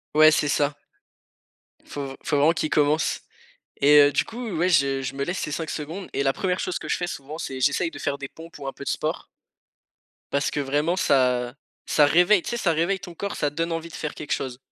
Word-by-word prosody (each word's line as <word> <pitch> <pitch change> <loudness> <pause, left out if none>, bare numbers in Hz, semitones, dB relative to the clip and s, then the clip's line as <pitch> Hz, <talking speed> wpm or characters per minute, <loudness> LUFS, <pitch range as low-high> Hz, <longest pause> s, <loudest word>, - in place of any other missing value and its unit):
Ouais 155 0 +8
c'est 150 - +2
ça. 145 0 +1 1.1
Faut 140 -1 -5
v 135 - -8
faut 155 -3 0
vraiment 150 +4 +4
qu'il 155 -2 -2
commence 150 +1 +2 0.6
et 145 +1 +7
heu, 145 0 +5
du 145 - +2
coup, 235 0 -6
ouais 175 +3 +2
je 140 -5 +3
je 135 +1 -4
me 140 - -2
laisse 175 +5 -3
ces - - -3
5 160 +1 -3
secondes 165 +6 -5
et 140 - 0
la 135 -1 +2
1re 185 -1 -1
chose 180 - -2
que - - -8
je - - +1
fais 175 - -2
souvent 150 -2 -7
c'est 130 -5 -5
j'essaye 145 +5 +2
de - - -10
faire 140 -1 -2
des 140 - -6
pompes 165 +2 -13
ou 140 - -7
un - - -4
peu - - -9
de - - -4
sport - - -2 1.1
parce 140 0 +1
que - - -3
vraiment 145 +5 0
ça 125 -8 +2 0.3
ça 150 - +4
réveille, 180 +6 +5
tu - - -5
sais, 235 - -1
ça 185 -7 +1
réveille 170 +4 0
ton 175 - -9
corps, 200 +4 -4
ça 145 - 0
te 145 - -22
donne 165 +1 -1
envie 165 0 -4
de - - -16
faire 150 - -5
quelque 150 - -8
chose. 125 -2 -2
150 Hz, 245 wpm, -24 LUFS, 140-170 Hz, 1.1 s, Ouais